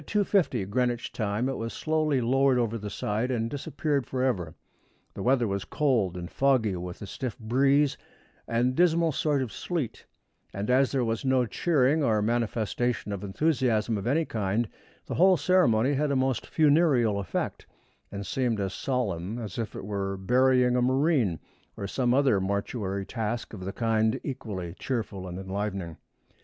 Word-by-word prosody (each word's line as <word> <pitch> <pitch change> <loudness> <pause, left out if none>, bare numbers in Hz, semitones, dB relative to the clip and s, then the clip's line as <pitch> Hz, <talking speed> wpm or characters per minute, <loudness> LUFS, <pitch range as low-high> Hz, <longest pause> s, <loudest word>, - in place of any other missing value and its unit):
50 190 - +1
Greenwich 120 +3 -1
time 110 +2 -1
it 135 - -2
was 115 0 -4
slowly 155 -4 0
lowered 135 +2 +3
over 115 -2 0
the 105 -2 -5
side 105 +4 -2
and 115 -3 0
disappeared 145 -2 -2
forever. 125 -11 -1 0.6
The - - -7
weather 125 -2 +2
was 100 -1 -2
cold 115 - 0
and 85 -1 -5
foggy, 125 -5 +2
with 90 +2 -6
a - - -5
stiff 115 +4 -5
breeze 135 +5 +2 0.5
and 120 +2 +1
dismal 165 +1 +3
sort 145 -1 +1
of 120 - -6
sleet, 165 -10 -4 0.5
and 100 +5 -1
as 130 +1 +4
there 130 -3 +1
was 115 0 -2
no 130 -2 +2
cheering 150 +2 +2
or 110 -5 +2
manifestation 115 0 -1
of 100 -1 -4
enthusiasm 115 -1 +1
of 100 +2 -3
any 155 +6 +2
kind, 110 0 -1 0.4
the - - -5
whole 185 +1 +5
ceremony 135 -8 +3
had 145 +2 +1
a 140 - +1
most 130 -3 0
funereal 145 -9 +3
effect, 95 -3 -3 0.4
and 100 0 -5
seemed 120 -3 0
as 95 -1 -2
solemn 110 -6 -2
as 110 -3 -6
if 110 -3 -4
we - - -5
were 100 -1 -3
burying 125 +4 +3
a 125 - +2
marine, 130 - +2 0.4
or 100 - -4
some 120 +5 0
other 130 -6 +3
mortuary 100 0 -2
task 115 +1 -3
of 95 -4 -7
the 95 - -3
kind 110 0 +1
equally 100 -10 -5
cheerful 110 -7 -3
and 90 0 -6
enlivening. 95 -3 -4
120 Hz, 165 wpm, -27 LUFS, 100-135 Hz, 0.6 s, whole